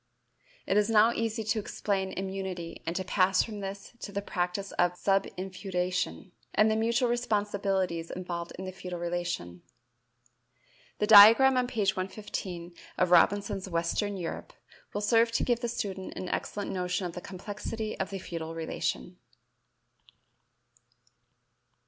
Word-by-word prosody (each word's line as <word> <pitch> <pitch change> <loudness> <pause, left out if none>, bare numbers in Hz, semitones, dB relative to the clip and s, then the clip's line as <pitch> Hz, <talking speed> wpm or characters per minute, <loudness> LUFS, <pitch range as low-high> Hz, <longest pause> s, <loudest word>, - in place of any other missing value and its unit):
It 195 - +1
is 210 +1 +3
now 225 +1 +5
easy 225 -1 -2
to 215 +1 0
explain 195 -2 -2
immunity 190 -3 -5
and 165 - -1
to 190 - -1
pass 185 0 +3
from 215 -3 -7
this 195 +2 -7
to 205 - -7
the 200 0 -3
practice 180 +1 -2
of 175 0 +2
subinfeudation, 185 -1 -2 0.2
and 215 +1 +5
the - - +2
mutual 235 +3 +2
responsibilities 200 -7 0
involved 175 -2 -5
in 190 - -6
the 185 - -4
feudal 180 -1 -7
relation. 170 - -3 1.4
The 210 - +1
diagram 225 +6 +9
on 250 -1 +2
page 205 -5 0
115 185 -2 -5 0.2
of 180 -1 +2
Robinson's 195 +1 +3
"Western 180 +4 -1
Europe" 180 - -5 0.4
will 205 - -3
serve 230 +2 +4
to - - +1
give 240 -2 +1
the 240 -1 -2
student 195 -5 -4
an 185 - -5
excellent 205 -1 -3
notion 180 0 -1
of 175 - -4
the 180 - -6
complexity 210 +3 -5
of 190 - -1
the 195 - -4
feudal 165 -3 -6
relation. 160 - -3
195 Hz, 140 wpm, -29 LUFS, 180-210 Hz, 1.4 s, diagram